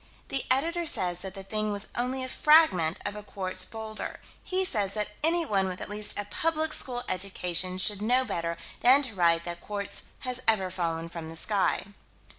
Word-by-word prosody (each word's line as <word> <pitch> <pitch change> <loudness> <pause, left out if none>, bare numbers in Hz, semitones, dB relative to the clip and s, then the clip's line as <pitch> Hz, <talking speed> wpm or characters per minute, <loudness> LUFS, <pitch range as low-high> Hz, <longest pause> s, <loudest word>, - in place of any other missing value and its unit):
The 270 - +1
Editor 330 +6 +1
says 180 - +1
that 190 0 -5
the 195 - -6
thing 215 +2 -2
was 205 0 0
only 255 +2 -1
a - - -3
fragment 250 - +4
of 205 - -3
a 210 - -6
quartz 190 -2 -2
boulder. 220 -1 -4 0.2
He 375 0 +1
says 205 - -1
that 210 -1 -2
anyone 315 - +2
with 185 -1 -5
at - - -6
least 210 0 +1
a 205 - -2
public 315 +7 -1
school 245 -1 +1
education 185 -1 0
should 205 +2 +1
know 250 +4 +3
better 170 -6 -3 0.2
than 265 +4 +6
to 255 -4 -2
write 170 -3 +3
that 175 -1 -6
quartz 205 -1 -2 0.2
has 255 0 -2
ever 195 -4 +3
fallen 165 -2 -2
from 165 -1 -7
the 165 - -8
sky. 200 +4 +1
205 Hz, 190 wpm, -28 LUFS, 185-255 Hz, 0.2 s, than